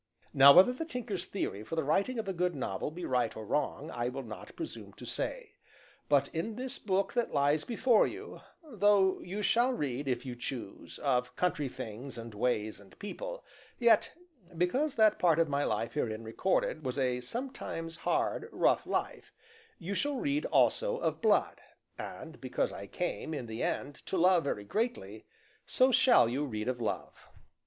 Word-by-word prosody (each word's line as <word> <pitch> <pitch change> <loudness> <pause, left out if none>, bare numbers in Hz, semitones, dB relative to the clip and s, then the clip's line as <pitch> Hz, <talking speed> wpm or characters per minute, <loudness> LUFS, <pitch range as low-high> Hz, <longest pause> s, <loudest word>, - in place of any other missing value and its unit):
Now 140 +1 +9
whether 185 - +7
the 290 - -4
Tinker's 235 - -4
theory 105 - -3
for 135 - -5
the 160 - 0
writing 200 - +1
of 225 - -3
a 195 - -1
good 180 -1 0
novel 100 -6 -3
be 170 +4 -6
right 125 -4 0
or 110 - -6
wrong, 145 +6 -1
I 120 0 -2
will 135 +2 -5
not 110 -3 -9
presume 330 -2 -7
to - - -11
say. - - -4 0.5
But 140 -1 +4
in 190 +7 -3
this 260 +2 -5
book 195 -1 0
that 240 -7 -1
lies 145 +2 +3
before 240 -1 +3
you, 395 +4 -8 0.2
though 205 -8 +3
you 200 +4 -5
shall 240 +4 +3
read, 140 - -3
if 125 -1 -1
you 125 -2 -5
choose, 120 -4 -6
of 125 -3 +1
country 150 -6 0
things 120 +4 -7
and 115 -1 -8
ways 110 -2 -1
and 100 -2 -18
people, - - -6 0.3
yet, 235 -3 +4 0.5
because 260 - +1
that 215 -2 +4
part 170 -3 +4
of 165 -1 +3
my 140 0 +1
life 115 - -1
herein 115 -6 -2
recorded 155 +6 0
was 130 0 -3
a 125 -2 0
something 230 - -5
hard, 165 - -1
rough - - +2
life, - - -3 0.5
you 185 +3 -5
shall 285 +7 -1
read 285 +3 0
also - - +2
of - - -2
blood; - - +2 0.4
and, - - -8
because - - -1
I - - -7
came, 175 -3 -3
in 130 - -4
the 110 0 -6
end, 140 +1 -2
to 190 - -1
love 180 -1 +4
very 105 -7 -2
greatly, 110 - -3 0.4
so 260 +1 +4
shall 250 - +6
you 130 +5 -1
read 110 -6 -4
of 125 -1 -2
love. 110 - -3
165 Hz, 180 wpm, -31 LUFS, -, 0.5 s, Now